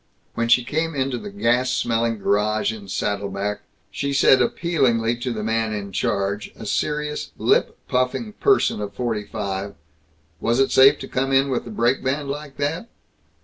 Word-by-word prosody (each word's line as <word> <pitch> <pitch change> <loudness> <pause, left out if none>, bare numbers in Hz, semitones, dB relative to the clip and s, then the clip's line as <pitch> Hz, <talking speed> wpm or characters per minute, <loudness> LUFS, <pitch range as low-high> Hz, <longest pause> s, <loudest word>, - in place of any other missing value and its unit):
When 115 0 -1
she 120 +1 +5
came 160 +5 -2
into 130 -2 -1
the 205 - -7
gas 125 -10 +1
smelling 115 -2 0
garage 105 +2 +1
in 105 -3 -10
Saddle 100 +1 -2
Back 100 +2 -3 0.3
she 140 0 -2
said 135 -1 +5
appealingly 120 -6 +1
to 125 +1 -3
the 110 -2 -4
man 110 0 0
in 100 -1 -5
charge, 100 +2 -1
a - - -9
serious, 150 +6 -2
lip - - +2
puffing 130 - -1
person 400 - +2
of 100 -1 -5
forty 115 -4 -2
five, 100 -1 -4 0.6
"Was 115 +3 +1
it 135 - +3
safe 135 +2 +7
to - - -6
come 135 +1 -1
in 135 +1 +3
with 130 - -1
the - - -8
brake 120 +4 +1
band 140 +2 -1
like 145 -1 -7
that?" 160 +10 -2
120 Hz, 175 wpm, -22 LUFS, 105-140 Hz, 0.6 s, safe